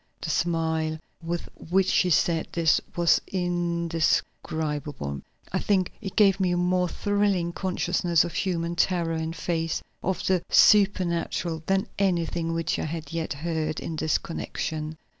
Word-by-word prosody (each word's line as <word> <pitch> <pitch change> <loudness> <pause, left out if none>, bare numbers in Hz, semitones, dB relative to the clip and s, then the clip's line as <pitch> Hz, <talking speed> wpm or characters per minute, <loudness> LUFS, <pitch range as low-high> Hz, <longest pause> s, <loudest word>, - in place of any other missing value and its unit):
The - - -2
smile 160 -2 0 0.2
with 170 +1 -3 0.3
which 190 +1 +3
she 180 - +3
said 165 -1 +2
this 165 -2 +3
was 170 -1 +4
indescribable. 160 - -1 0.3
I - - 0
think 190 -3 +1
it 195 -4 -6
gave 200 -3 +5
me 185 -2 +2
a - - +1
more 180 0 +1
thrilling 200 -4 0
consciousness 175 -3 +1
of 170 - -5
human 170 -2 -1
terror 170 -2 +1
in 160 0 -2
face 165 -1 -2 0.2
of 190 0 -1
the 185 -2 +2
supernatural 175 -5 +3
than 195 0 +2
anything 170 -3 0
which 165 0 -1
I - - -2
had 155 -1 -5
yet 165 -2 -2
heard 155 +1 -2
in 165 - -5
this 155 0 +1
connection. 155 -1 -4
170 Hz, 140 wpm, -26 LUFS, 160-180 Hz, 0.3 s, gave